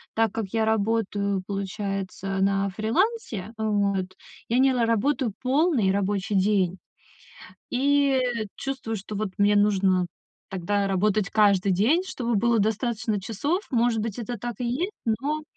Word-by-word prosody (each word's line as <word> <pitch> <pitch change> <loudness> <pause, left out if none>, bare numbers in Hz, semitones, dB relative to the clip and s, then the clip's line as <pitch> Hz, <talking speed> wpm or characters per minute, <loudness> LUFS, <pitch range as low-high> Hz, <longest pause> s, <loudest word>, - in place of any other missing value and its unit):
Так 225 -2 +2
как 225 -2 -2
я 225 -1 +2
работаю, 205 -3 0
получается, 195 -1 -3
на 195 0 +2
фрилансе, 225 - -1
вот, 200 -3 0 0.3
я 235 - +2
не 265 0 +4
ла 240 -2 +2
работаю 230 +2 +1
полный 265 - +2
рабочий 200 0 -1
день. 190 -2 +2 0.9
И 275 +1 +3 0.4
чувствую, 265 -5 -4
что 205 +1 -7
вот 215 0 -1
мне 205 0 +4
нужно 195 -3 +3 0.4
тогда 195 +2 -1
работать 200 +1 +1
каждый 200 -3 +3
день, 240 - +3
чтобы 240 -9 -2
было 230 +2 +2
достаточно 220 0 0
часов. 280 - -2
Может 235 -3 +2
быть, 220 0 -4
это 240 0 -4
так 240 +2 -4
и - - -1
есть, 315 - -1
но, 275 +7 -1
215 Hz, 140 wpm, -25 LUFS, 195-240 Hz, 0.9 s, не